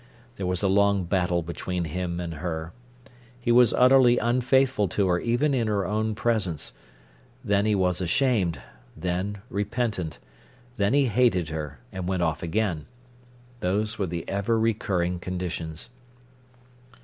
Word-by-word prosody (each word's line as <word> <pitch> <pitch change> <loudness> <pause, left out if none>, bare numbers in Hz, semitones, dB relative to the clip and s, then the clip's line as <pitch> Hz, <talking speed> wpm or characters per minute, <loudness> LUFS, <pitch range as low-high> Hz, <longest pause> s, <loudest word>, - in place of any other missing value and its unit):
There 95 - -3
was 90 +1 0
a - - +4
long 100 0 +3
battle 90 -1 0
between 85 +2 -3
him 85 +2 -3
and 85 -2 -4
her. 80 0 -4 0.7
He 120 -1 0
was 120 -1 +6
utterly 125 -1 +5
unfaithful 125 -1 +2
to 100 +3 0
her 90 -1 +2
even 120 +7 +1
in 120 -4 +1
her 100 -3 0
own 110 +2 -1
presence; 100 -9 -1 0.7
then 100 0 +2
he 105 - +3
was 90 -2 +1
ashamed, 95 - +1 0.4
then 95 +3 -3
repentant; 105 - -2 0.6
then 100 +5 +1
he 145 -1 +4
hated 105 -8 +2
her, 75 -3 -5
and 95 -1 -5
went 95 -2 0
off 80 -2 -1
again. 85 -3 -1 0.7
Those 105 +4 -1
were 100 - 0
the 85 -1 -5
ever 100 +4 0
recurring 95 -6 0
conditions. 90 0 -5
95 Hz, 140 wpm, -26 LUFS, 90-110 Hz, 0.7 s, was